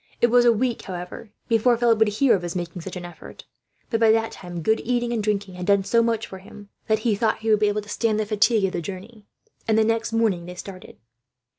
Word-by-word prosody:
It 240 - +3
was 245 0 +5
a 240 - +7
week, 235 +1 -1
however, 185 +4 -8 0.2
before 230 +1 +3
Philip 230 -2 +3
would 220 - +4
hear 225 +5 +3
of 190 - +1
his 175 0 -5
making 175 0 -5
such 190 +3 -8
an 180 -1 -6
effort; 175 -2 -12 0.5
but 225 - +1
by 225 -1 +4
that 225 0 +1
time, 175 -2 -8
good 220 +4 +2
eating 240 0 -1
and 225 - -1
drinking 205 -2 -2
had 180 0 -7
done 200 -1 +4
so 230 +4 +2
much 230 -1 0
for 190 - -10
him 200 +2 -14 0.2
that 220 - +3
he 230 - +3
thought 215 +2 0
he 220 0 0
would 215 - +4
be 210 - +3
able 205 +1 0
to - - -16
stand 215 0 0
the 215 - 0
fatigue 215 0 +2
of 190 - -1
the 175 - -3
journey, 200 +4 -9 0.4
and 220 -1 +2
the 220 - +5
next 225 +1 0
morning 215 -7 0
they 180 - -8
started. 185 +1 -10
215 Hz, 255 wpm, -23 LUFS, 190-225 Hz, 0.5 s, a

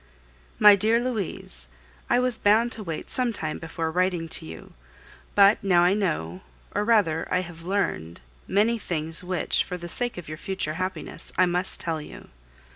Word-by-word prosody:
My 210 -1 +8
dear 220 +4 +2
Louise, 200 - -2 0.4
I 240 - +4
was 250 -2 0
bound 220 +4 +3
to 225 - -5
wait 165 -6 -6
some 250 -2 +1
time 155 -8 -4
before 160 0 -4
writing 180 -1 0
to 160 - -1
you; 80 0 -11 0.6
but 200 +1 +5
now 180 -3 +4
I 180 +2 +4
know, 155 - -2 0.3
or 205 - 0
rather 205 -8 +2
I 180 - +2
have 170 -2 -10
learned, 165 - -2 0.3
many 220 +4 +2
things 165 -2 -1
which, 180 0 0
for 180 - -6
the 175 0 -7
sake 240 +6 -1
of 175 - -8
your 155 +1 -7
future 190 -5 -2
happiness, 185 -4 -4
I 185 - +5
must 180 +1 -1
tell 160 -2 -2
you. - - -12
180 Hz, 175 wpm, -25 LUFS, 160-210 Hz, 0.6 s, My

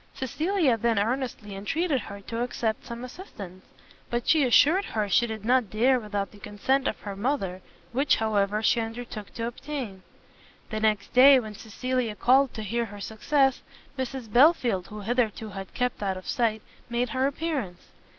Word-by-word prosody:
Cecilia 305 - +1
then 230 0 +1
earnestly 225 -2 -2
entreated 275 - 0
her 200 -1 -9
to 230 +4 -4
accept 230 -3 -2
some 235 0 -6
assistance; 205 - -9 0.5
but 240 0 -2
she 315 -3 +5
assured 295 - +5
her 215 - -2
she 235 +5 +3
did 220 -2 -6
not 250 -3 +3
dare 250 +5 +3
without 205 -3 -3
the 205 - -15
consent 215 +7 0
of - - -2
her 200 -2 -6
mother, 195 -5 -2 0.3
which, 270 +3 +3
however, 210 -1 0
she 235 - +3
undertook 225 -2 -6
to 230 - -2
obtain. 240 -5 -5 0.7
The 215 - -2
next 215 -2 0
day, 265 +2 +8
when 215 -3 -7
Cecilia 230 +2 -3
called 260 +3 +4
to 220 - -4
hear 235 +3 -1
her 205 -1 -10
success, 265 +6 +1 0.3
Mrs 260 -4 -5
Belfield, 245 - +4
who 210 0 -8
hitherto 225 -1 -1
had 195 -1 -8
kept 250 -3 -1
out 190 -2 -1
of 185 - -10
sight, 220 -3 0 0.3
made 240 +1 0
her 265 -1 +1
appearance. 280 - -4
235 Hz, 170 wpm, -27 LUFS, 210-260 Hz, 0.7 s, day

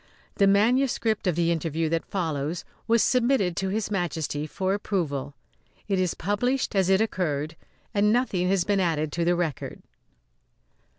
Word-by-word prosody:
The 200 - +5
manuscript 225 +1 +2
of 175 - +2
the 170 0 +2
interview 165 -1 -1
that 165 0 -2
follows 160 -3 -2 0.2
was 230 0 +4
submitted 240 -8 +2
to 190 - -1
His 210 +1 -2
Majesty 160 -5 -2
for 190 +4 -1
approval. 145 -9 -2 0.5
It 195 -2 +1
is 180 -2 0
published 230 +7 -1
as 190 -1 +3
it 190 +2 +4
occurred, 160 -7 -1 0.4
and 210 +1 +3
nothing 205 -7 +1
has 190 -2 +2
been 200 +1 +1
added 155 -4 0
to 170 - -1
the 175 +1 +3
record. 165 -6 -3
185 Hz, 155 wpm, -26 LUFS, 165-205 Hz, 0.5 s, The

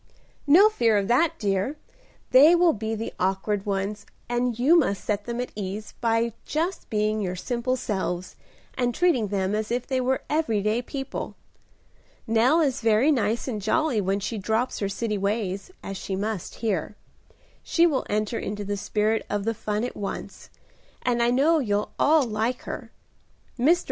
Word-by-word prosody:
"No 355 +9 +8
fear 235 - +2
of 200 -1 0
that, 285 +7 +3
dear. 200 +8 -1 0.5
They 290 +7 +8
will 345 -1 +4
be 220 +1 -3
the 225 +1 -5
awkward 195 +2 -1
ones, 200 +1 -2 0.2
and 240 -1 0
you 275 +8 +5
must 255 - +2
set 205 -1 -1
them 235 0 -4
at 250 - -3
ease 205 +1 -5
by 230 0 +1
just 335 +5 -2
being 215 0 0
your 180 -2 -2
simple 245 +6 -1
selves, 185 -6 -3 0.4
and 245 -2 -1
treating 305 -12 +2
them 195 0 -1
as 215 0 -1
if 240 +1 -1
they 260 -2 0
were 260 +1 0
every 295 -9 +1
day 215 +3 +1
people. 270 +1 -5 0.9
Nell 245 +8 +3
is 275 -4 0
very 225 +6 +4
nice 230 -3 0
and 220 -5 -3
jolly 235 +2 +1
when 195 +1 0
she 215 +2 -3
drops 220 +5 -1
her 200 - -1
city 210 0 -2
ways, 200 - -2
as 195 0 -5
she 190 - -4
must 205 -1 -3
here. 200 -2 -1 0.7
She 335 - +3
will 295 -6 +1
enter 215 +2 -1
into 205 0 -4
the 205 0 -2
spirit 215 +2 0
of 205 -1 -1
the 225 +2 0
fun 210 0 -2
at 245 - -4
once, 200 -1 -6 0.5
and 240 -1 +1
I 235 - +3
know 290 +7 +3
you'll 210 -5 -1
all 310 0 +5
like 230 +1 -1
her. - - -7 0.7
Mr. 325 +8 +5
225 Hz, 175 wpm, -25 LUFS, 205-255 Hz, 0.9 s, No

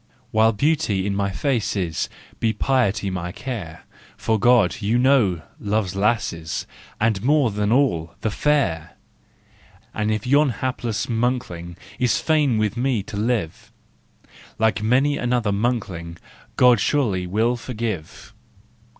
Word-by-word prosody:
While 110 +1 +4
beauty 110 -5 0
in 100 -1 -1
my 100 0 0
face 120 +2 -1
is, 90 -5 -2 0.3
Be 110 -1 +1
piety 105 -8 +1
my 90 -1 -4
care, 100 -10 -6 0.3
For 110 -1 0
God, 120 -4 +3
you 110 +4 +1
know, 120 - +3 0.2
loves 100 -2 -1
lasses, 100 -6 -1 0.3
And, 110 -3 +1
more 140 -1 +3
than 105 +1 -1
all, 100 - +1
the 110 - -1
fair. 95 - 0 1.0
And 105 0 -1
if 105 -1 -2
yon 145 +3 +4
hapless 120 -2 -2
monkling 115 -8 -2 0.2
Is 120 -5 +2
fain 150 -7 +2
with 110 0 0
me 120 -4 0
to 100 - -8
live, 105 -6 -2 0.9
Like 110 -2 +1
many 130 +6 +2
another 120 -3 0
monkling, 100 -6 -2 0.4
God 125 -3 +5
surely 100 -10 0
will 110 +6 +1
forgive. 115 -8 -5
110 Hz, 130 wpm, -22 LUFS, 95-125 Hz, 1.0 s, God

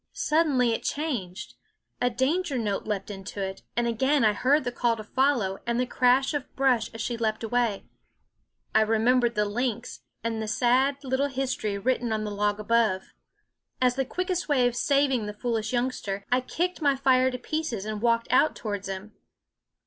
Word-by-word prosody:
Suddenly 295 -6 +2
it - - -2
changed; 235 - -3 0.5
a 245 - +3
danger 275 +5 0
note 210 -4 -2
leaped 210 -1 -3
into 195 0 -8
it; 190 0 -4 0.2
and 240 - +2
again 265 +3 +2
I 210 - +4
heard 270 +7 +2
the 245 - -2
call 240 -1 +1
to 220 - -8
follow 240 -5 +1
and 235 0 0
the 250 - +2
crash 255 +3 +2
of 290 -3 -5
brush 260 -4 +2
as 225 - -7
she 235 0 -2
leaped 220 -1 -1
away. 230 -2 0 0.9
I 220 - +5
remembered 235 +2 +2
the 210 0 +2
lynx 235 +2 -3 0.2
and 225 -1 -2
the 220 - -3
sad 255 +5 +2
little 265 +1 0
history 255 -6 -2
written 245 +2 0
on 215 -1 -1
the 210 - -4
log 205 0 0
above. 215 -3 +1 0.7
As 250 -1 +3
the 270 +1 0
quickest 360 +4 -2
way 260 -4 +3
of 245 - -2
saving 270 -4 +2
the 210 - -5
foolish 225 -1 -2
youngster, 240 -6 -2
I 250 +1 +3
kicked 350 +7 -2
my 285 -2 +3
fire 260 -1 +3
to 250 - -4
pieces 250 -6 -3
and 215 -1 -4
walked 230 0 +2
out 300 +4 +4
towards 205 -3 -4
him. 195 +2 -6
240 Hz, 180 wpm, -26 LUFS, 215-265 Hz, 0.9 s, I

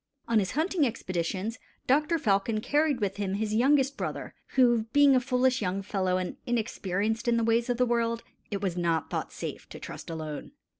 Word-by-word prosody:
On 230 -2 +3
his 200 +2 -1
hunting 320 +3 +1
excursions 200 -1 -2 0.3
Doctor 300 +5 +3
Falcon 215 -4 +1
carried 290 +3 +1
with 195 -1 -1
him 195 -1 -1
his 215 +1 -1
youngest 270 +4 +3
brother, - - -4 0.2
who, 240 -4 +4
being 285 -1 +6
a - - +5
foolish 255 0 +1
young 195 0 -1
fellow 190 -2 0
and 185 -1 -4
inexperienced 220 -1 -1
in 235 -1 +3
the 230 - +1
ways 230 +2 +2
of 245 - +1
the 250 - +3
world, 230 -1 0 0.3
it 200 -1 -3
was 185 -3 0
not 170 -2 0
thought - - -3
safe - - -7
to - - -9
trust - - -8
alone. 155 -2 -6
230 Hz, 190 wpm, -28 LUFS, 195-255 Hz, 0.3 s, being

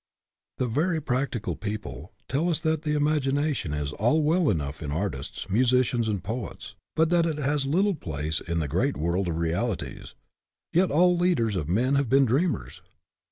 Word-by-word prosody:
The 130 - 0
very 160 +8 0
practical 125 -5 -2
people 100 - -6 0.2
tell 155 +7 0
us 165 - +1
that 160 -2 0
the 150 -1 -1
imagination 145 - +1
is 75 0 -3
all 125 +9 +2
well 160 +2 +3
enough 75 -5 -2
in 75 -3 -4
artists, 95 +3 -3
musicians, 120 +2 +2
and 100 -4 -2
poets, 115 +2 -5 0.2
but 160 +1 +3
that 170 -1 +4
it 155 -2 -2
has 145 -1 0
little 195 +8 +2
place 80 - -3
in 85 -1 -3
the 80 -3 0
great 65 - 0
world 85 +5 0
of 80 -2 -2
realities. 85 +6 -2 0.6
Yet 180 +2 +4
all 180 +4 +4
leaders 170 - +1
of 80 -4 -2
men 120 +9 +2
have 140 -3 +2
been 135 +2 +5
dreamers. 145 +9 -1
125 Hz, 170 wpm, -26 LUFS, 90-155 Hz, 0.6 s, been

